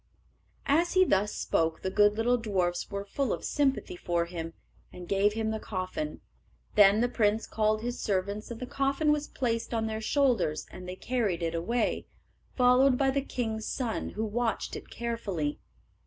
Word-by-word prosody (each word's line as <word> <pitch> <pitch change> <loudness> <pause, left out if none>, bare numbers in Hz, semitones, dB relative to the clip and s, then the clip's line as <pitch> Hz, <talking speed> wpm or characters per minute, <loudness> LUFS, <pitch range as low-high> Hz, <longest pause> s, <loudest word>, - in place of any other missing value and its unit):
As 330 +5 +2
he 370 -1 +6
thus 205 - +2
spoke 160 0 0
the 190 - -1
good 205 +1 +4
little 240 +2 +3
dwarfs 185 -6 -1
were 200 -1 -4
full 270 +6 -1
of - - -3
sympathy 275 -9 0
for 170 -1 -1
him, 165 -1 -6 0.4
and 180 -1 -10
gave 200 +2 +2
him 220 0 -1
the 220 - -2
coffin. 210 +12 -4 0.5
Then 205 0 +6
the 245 - +3
prince 220 -2 +1
called 215 0 0
his 245 +1 -3
servants, 200 +1 -1
and 235 -1 -6
the 250 - -4
coffin 275 +3 +1
was 300 0 0
placed 230 -2 -2
on 225 -1 0
their 220 0 -3
shoulders, 225 - +1
and 180 0 -9
they 180 - -5
carried 205 -6 -1
it 165 0 -1
away, 215 +8 -1 0.5
followed 250 +1 +5
by 270 0 +3
the 275 +1 0
king's 220 -5 -3
son, 240 -4 -2
who 220 - 0
watched 225 +2 -1
it - - -8
carefully. 200 -11 -3
220 Hz, 175 wpm, -29 LUFS, 190-250 Hz, 0.5 s, he